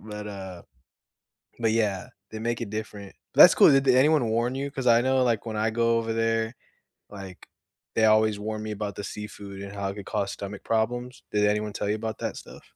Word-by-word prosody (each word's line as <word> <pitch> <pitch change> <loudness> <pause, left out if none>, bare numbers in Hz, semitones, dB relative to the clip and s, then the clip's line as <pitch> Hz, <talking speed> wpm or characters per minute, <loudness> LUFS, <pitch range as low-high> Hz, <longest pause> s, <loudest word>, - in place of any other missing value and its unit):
But, 105 -1 -8
uh 95 -3 -8 1.0
but, 115 -1 +2
yeah, 105 -5 0 0.2
they 110 0 -7
make 120 +1 -2
it 115 - -4
different. 105 -2 -7 0.2
That's - - +9
cool. - - +7
Did 135 0 +3
anyone 130 +1 +4
warn 120 +3 0
you? 140 +1 -3
'Cause 130 -2 -5
I 115 0 +6
know, 130 0 +2
like, 115 -3 0
when 110 -1 -4
I 110 +1 +1
go 115 0 +2
over 115 0 -2
there, 115 +1 0 0.6
like, 95 -3 -10 0.5
they 110 - +3
always 110 -1 +3
warn 110 +1 -4
me 110 - -5
about 105 -2 -4
the 100 - -6
seafood 100 -1 -8
and 100 0 -8
how 100 -1 -3
it 100 - -6
could 100 - -8
cause 100 -2 -2
stomach 100 0 -7
problems. 120 +3 -2
Did 105 0 +2
anyone 105 0 0
tell 100 - -3
you 105 - +1
about 110 0 -5
that - - -4
stuff? - - -12
110 Hz, 210 wpm, -26 LUFS, 105-115 Hz, 1.0 s, That's